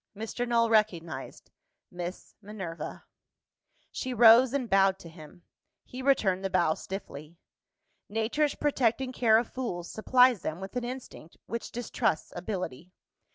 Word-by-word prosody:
Mr. 225 +3 -4
Null 235 -1 +3
recognised 175 -11 -1 0.4
Miss 175 +1 -7
Minerva. 190 -6 -7 0.9
She 255 -1 -4
rose, 235 +2 +7
and 270 -3 -1
bowed 195 -1 +3
to 170 - -12
him. 160 +1 -14 0.4
He 255 - -8
returned 205 -9 +2
the 195 - -1
bow 175 -4 +2
stiffly. 165 -4 -8 0.7
Nature's 225 +8 0
protecting 260 -3 0
care 225 -3 +4
of 230 0 -2
fools 180 -10 -4
supplies 250 0 +4
them 155 +2 -4
with 195 +4 -8
an 250 - -1
instinct 245 -9 -8
which 235 0 -5
distrusts 230 -6 -2
ability. 180 -5 -5
215 Hz, 130 wpm, -28 LUFS, 175-245 Hz, 0.9 s, rose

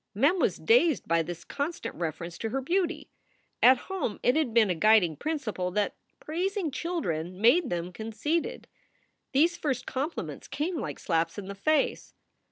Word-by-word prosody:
Mem 290 - +3
was - - +2
dazed 345 - +3
by 165 0 +3
this 170 +1 -6
constant 295 +4 -4
reference 170 +1 -5
to 225 - -2
her 265 +4 -1
beauty. 345 +5 -1 0.5
At 255 +1 +8
home 350 - -3
it 245 - +4
had 310 -6 +1
been 220 -4 +4
a - - +2
guiding 190 -3 +4
principle 250 - -2
that 205 0 0 0.2
praising 360 +1 -2
chil 335 +5 -2
dren 170 - -3
made 255 - +4
them 175 +1 -3
conceited. 225 - -2 0.6
These 330 +6 +3
first 260 -5 -2
compliments 285 +6 -4
came 320 +2 -2
like - - -4
slaps 165 0 -1
in 205 - -5
the 200 - -5
face. 285 +9 0
255 Hz, 165 wpm, -28 LUFS, -, 0.6 s, At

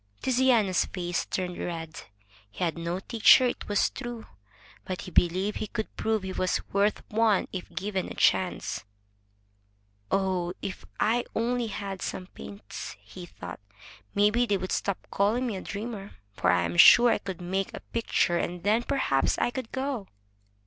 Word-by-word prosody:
Tiziano's 245 -7 +3
face 175 -2 -3
turned 180 -1 -3
red. 165 -2 -5 0.4
He 100 - -5
had 165 -2 0
no 170 +2 -3
teacher, 230 +4 +6
it 245 - -2
was 205 -1 +2
true. 240 -3 -6 0.6
But 185 -1 -4
he 185 - -8
believed 185 +5 +2
he 215 - -3
could 220 0 -5
prove 220 -2 0
he 190 0 -4
was 185 0 0
worth 200 +1 +1
one 220 -2 +3
if 185 -2 -5
given 190 0 -3
a - - -7
chance. 135 - +1 1.3
"Oh, 185 -2 0
if 195 - -6
I 235 +3 +2
only 240 +1 0
had 195 -2 -5
some 185 - -4
paints!" 200 +2 -9
he 180 -2 -11
thought. 90 - -9 0.6
"Maybe 210 +4 +3
they 205 - +2
would 185 0 -5
stop 200 - -1
calling 215 +6 +2
me 230 -5 -2
a 190 - -5
dreamer, 205 -1 -6 0.2
for - - +1
I 90 0 +4
am 85 0 -2
sure 240 - +9
I - - +1
could 190 -3 -6
make 190 +2 -2
a - - -6
picture, 175 -6 +1
and 175 0 -3
then 215 +4 +3
perhaps 240 - +1
I - - +1
could 255 -2 -5
go." 260 -6 -3
200 Hz, 165 wpm, -28 LUFS, 180-225 Hz, 1.3 s, sure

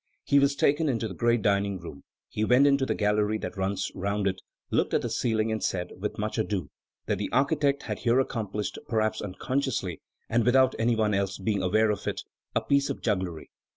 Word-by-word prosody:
He 140 - +4
was 140 0 +3
taken 145 +2 +2
into 115 -3 -1
the 95 - -7
great 120 +3 +1
dining 100 -1 +1
room; 85 -5 -10 0.2
he 105 - -3
went 125 +5 +5
into 140 -1 +3
the - - 0
gallery 105 0 +1
that 110 - -6
runs 95 +1 -2
round 100 +2 -2
it, 95 -1 -1 0.3
looked - - +1
at - - +1
the - - -3
ceiling, 110 -2 0
and 110 -1 -2
said, 90 -1 -2
without 105 +3 -4
more 110 +1 -1
ado, 95 -9 -3 0.3
that - - -1
the - - -2
architect 140 0 +2
had 105 -3 -4
here 120 +2 +3
accomplished, 105 -5 -2
perhaps 110 -1 0
unconsciously, 100 - -2 0.3
and 115 +1 +2
without 130 +2 +4
any 115 +1 +2
one 110 -1 +1
else 100 0 0
being 100 0 -1
aware 105 +4 +3
of 105 - -4
it, - - -2 0.3
a - - +3
piece 140 0 +2
of - - -5
jugglery. 95 -7 -2
110 Hz, 205 wpm, -27 LUFS, 100-125 Hz, 0.3 s, went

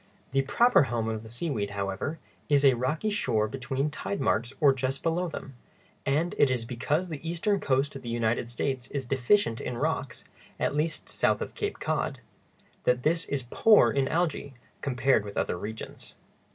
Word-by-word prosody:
The 135 0 +3
proper 235 - +4
home 115 -2 -1
of 110 -1 -2
the 110 - -11
seaweed, 120 -5 -2
however, 100 +10 -2 0.3
is 145 -1 +4
a 135 - +7
rocky 155 - -1
shore 115 - +1
between 135 +4 -2
tide 200 +6 -4
marks 115 +2 +1
or 145 -4 +6
just 135 +1 -2
below 170 +2 +1
them, 140 -4 -7 0.5
and 155 +6 +1
it 145 - +6
is 125 -3 -1
because 140 +9 -1
the 155 0 -5
eastern 195 +4 +1
coast 135 -1 +1
of 135 - -6
the 120 - -6
United 115 0 0
States 130 +1 -2
is 140 -2 -4
deficient 130 - +2
in 120 - -4
rocks—at 140 -3 -3
least 155 +1 -1
south - - +1
of - - -5
Cape - - -3
Cod—that 125 0 -3
this 165 +1 +2
is 140 -2 -2
poor 220 -2 +6
in 140 -1 +1
algæ, 155 -3 -1 0.3
compared 130 -3 +2
with 100 -1 -8
other - - 0
regions. 105 +5 -7
135 Hz, 170 wpm, -28 LUFS, 120-155 Hz, 0.5 s, a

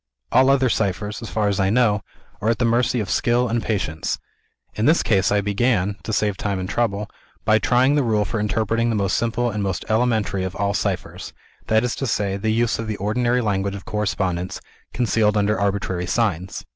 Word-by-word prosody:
All 130 +2 +5
other 135 -1 +4
ciphers, 105 -2 -1
so 115 - -7
far 110 -1 0
as 100 -1 0
I 95 0 +2
know, 110 -2 +3 0.4
are 110 - +1
at 115 - +2
the 125 - +1
mercy 120 +1 +2
of 105 - -4
skill 120 +6 +1
and 115 0 0
patience. 90 -9 -2 0.6
In 110 - 0
this 160 +3 +4
case 100 -4 +2
I 105 0 +3
began 105 -1 +1
(to - - -5
save 105 -2 0
time 100 -2 -2
and 95 0 -3
trouble) 105 -1 -1 0.4
by 110 0 +4
trying 125 +6 +3
the 145 - +3
rule 110 -4 +1
for 110 - -3
interpreting 110 +2 0
the 115 - 0
most 100 -2 0
simple, 120 +1 0
and 105 -1 -3
most 95 -2 -2
elementary, 110 -4 +1
of 95 -1 -4
all 100 0 0
ciphers 100 -3 -3 0.3
that 110 +1 +3
is 125 - -1
to 135 - -2
say, 100 -3 0
the 105 +3 -2
use 115 0 +1
of 115 - -4
the 105 -1 -3
ordinary 120 +5 +1
language 100 -2 -1
of 100 - -9
correspondence, 95 -4 -2 0.3
concealed 110 -2 +1
under 105 +1 +1
arbitrary 95 -3 -1
signs. 95 -3 -1
105 Hz, 205 wpm, -22 LUFS, 100-115 Hz, 0.6 s, All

